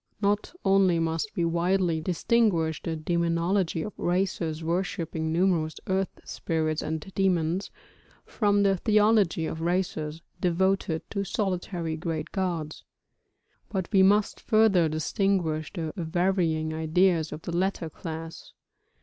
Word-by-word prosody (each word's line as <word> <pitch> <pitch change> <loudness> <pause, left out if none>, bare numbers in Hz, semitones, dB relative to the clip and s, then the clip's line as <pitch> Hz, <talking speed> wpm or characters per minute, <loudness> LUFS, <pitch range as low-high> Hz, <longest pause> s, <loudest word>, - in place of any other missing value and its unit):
Not 205 0 0
only 195 -3 +4
must 165 +4 -1
we 170 -4 +1
widely 170 0 +1
distinguish 175 -2 +1
the 165 - -3
demonology 170 +2 0
of 210 - -6
races 175 -3 -1
worshipping 165 -2 -2
numerous 165 -2 +1
earth 190 -1 -1
spirits 155 -1 -2
and 160 0 -3
demons, 180 -1 +1 0.6
from 205 -2 +2
the 195 -1 +3
theology 210 -5 +3
of 160 - -4
races 165 -3 -2 0.2
devoted 180 -2 0
to 200 -2 -1
solitary 180 -4 -2
great 160 -1 -4
gods; 170 -5 -3 0.9
but 190 -4 -2
we 195 - +5
must 200 +2 +3
further 215 -7 +3
distinguish 160 -1 0
the 165 -5 -4
varying 170 -2 0
ideas 160 +1 +2
of 155 +1 -7
the 170 - -4
latter 185 -2 0
class. 165 0 -8
175 Hz, 120 wpm, -27 LUFS, 160-195 Hz, 0.9 s, we